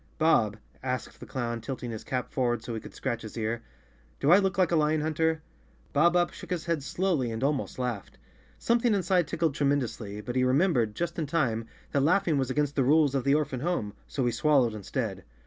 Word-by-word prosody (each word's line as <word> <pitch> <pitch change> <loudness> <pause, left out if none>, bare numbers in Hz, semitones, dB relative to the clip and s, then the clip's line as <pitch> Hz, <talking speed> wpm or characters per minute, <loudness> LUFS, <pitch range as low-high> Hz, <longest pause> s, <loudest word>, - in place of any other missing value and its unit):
"Bob," 115 -10 +3 0.2
asked 130 0 -4
the 125 - -10
clown, 120 0 -3
tilting 120 0 -5
his 110 - -6
cap 130 -2 -3
forward 120 -4 0
so 120 - -5
he 110 - -3
could - - -12
scratch 120 0 -2
his 110 - -8
ear, 115 +1 -2 0.6
"do 145 - +3
I 185 - +8
look 190 -3 0
like 185 -3 +3
a - - +3
lion 155 0 +2
hunter?" 160 +1 0 0.5
Bob 170 +4 +4
Up 175 -1 +2
shook - - -10
his 175 -3 -2
head 165 -3 0
slowly 160 -4 0
and 110 +3 -3
almost 140 -1 -1
laughed. 125 -6 -4 0.4
Something 235 -1 +2
inside 185 -3 +2
tickled 165 -3 0
tremendously, 125 -8 -1
but 120 +4 -5
he 130 - +3
remem¬ 140 +9 +3
bered, 110 -4 +1
just 170 0 -3
in 155 - -1
time, 120 -8 0 0.2
that 140 - +2
laughing 165 -1 +3
was 130 -1 -1
against 145 +1 0
the 135 - +3
rules 145 +1 +4
of 135 -2 0
the 140 +1 +4
orphan 150 -4 -1
home, 130 - -1
so 130 - -1
he 120 - +2
swallowed 130 -2 +3
instead. 105 -2 -4
140 Hz, 215 wpm, -28 LUFS, 120-160 Hz, 0.6 s, I